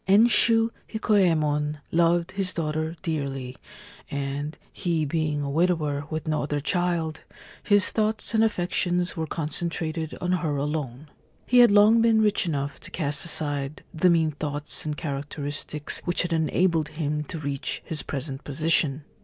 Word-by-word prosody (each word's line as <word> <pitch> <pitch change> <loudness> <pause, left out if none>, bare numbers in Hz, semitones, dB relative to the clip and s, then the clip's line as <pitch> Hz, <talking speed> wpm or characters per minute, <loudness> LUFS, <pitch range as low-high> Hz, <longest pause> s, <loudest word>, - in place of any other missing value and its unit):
Enshu 225 +2 +5 0.2
Hikoyemon 155 -9 +1
loved 170 +1 +2
his 190 -1 -2
daughter 155 0 -2
dearly, 135 -6 -3 0.5
and, 140 +2 -4 0.2
he 165 -4 -1
being 150 -1 -1
a 140 - -3
widower 155 -3 0
with 155 0 -4
no 155 -1 0
other 145 0 -2
child, 165 +1 -1 0.4
his 205 -1 +3
thoughts 220 +1 0
and 220 0 +4
affections 180 -3 0
were 160 -2 -3
concentrated 160 +1 -3
on 180 - -1
her 160 -5 0
alone. 145 -1 -3 0.4
He 250 - +4
had 240 - +8
long 210 +3 +6
been 225 -1 +4
rich 210 -2 +2
enough 140 -3 -3
to - - -11
cast 150 -4 -1
aside 145 -3 -1
the 170 +3 +3
mean 165 -2 +3
thoughts 145 0 -5
and 150 -1 -3
characteristics 145 +1 -3
which 175 0 +3
had 175 -1 -2
enabled 165 0 +1
him 150 -1 -1
to 165 - -6
reach 140 -1 -3
his 160 -4 -2
present 135 0 -5
position. 150 0 +1
160 Hz, 145 wpm, -25 LUFS, 145-180 Hz, 0.5 s, had